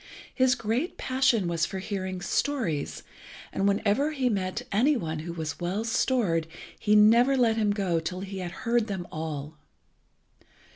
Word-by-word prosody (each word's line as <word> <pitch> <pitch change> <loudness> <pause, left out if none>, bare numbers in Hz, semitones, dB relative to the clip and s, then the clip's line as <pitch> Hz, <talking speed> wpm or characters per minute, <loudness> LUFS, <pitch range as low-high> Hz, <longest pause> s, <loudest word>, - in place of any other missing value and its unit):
His 255 -1 +3
great 235 +10 -2
passion 255 -7 +2
was 170 -2 0
for 195 - -5
hearing 190 -1 -4
stories, 210 - -1 0.5
and 195 - +1
whenever 215 +9 +1
he 260 -4 +1
met 185 -4 -2
any 255 +8 +3
one 160 -6 -3
who 165 +2 -5
was 160 -3 -5
well 185 +5 -2
stored 225 -8 +1 0.3
he 210 -1 +3
never 235 +6 +6
let 235 -3 +3
him 215 -2 +1
go 195 -5 +1
till 180 +3 -4
he 195 0 -6
had 180 -1 -4 0.2
heard 230 -1 +2
them 190 -4 -4
all. 155 -1 -5
200 Hz, 155 wpm, -27 LUFS, 175-240 Hz, 0.5 s, never